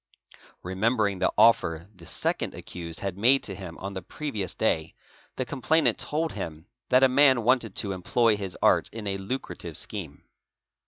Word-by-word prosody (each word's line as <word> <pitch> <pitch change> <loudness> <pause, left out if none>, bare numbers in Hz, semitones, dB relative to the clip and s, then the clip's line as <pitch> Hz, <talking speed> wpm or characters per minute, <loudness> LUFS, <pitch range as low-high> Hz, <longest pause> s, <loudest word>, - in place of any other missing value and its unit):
_ - - -17 0.3
Remembering 100 +1 0
the 95 - +2
offer 85 -7 +4
the 85 -4 -15
second - - -2
accused 85 -2 -6
had 95 -1 -4
made 130 +5 +4
to 100 - -5
him 90 -4 -8
on 100 +1 -6
the 95 - -5
pre 150 - -6
oy - - -5
ious 95 -2 -2
day, - - 0 0.4
the 130 - -2
complainant 145 +5 +1
told 160 +2 -1
him' 80 -5 -6 0.2
that 130 +1 +5
a - - +8
man 130 -2 +5
wanted 120 -4 +2
to 100 - -1
employ 110 +5 +2
his 100 -3 -5
art - - +4
'in 110 -1 -7
a 95 -1 -2
lucrative 125 +8 -4
scheme. - - -7
100 Hz, 180 wpm, -27 LUFS, 95-125 Hz, 0.4 s, a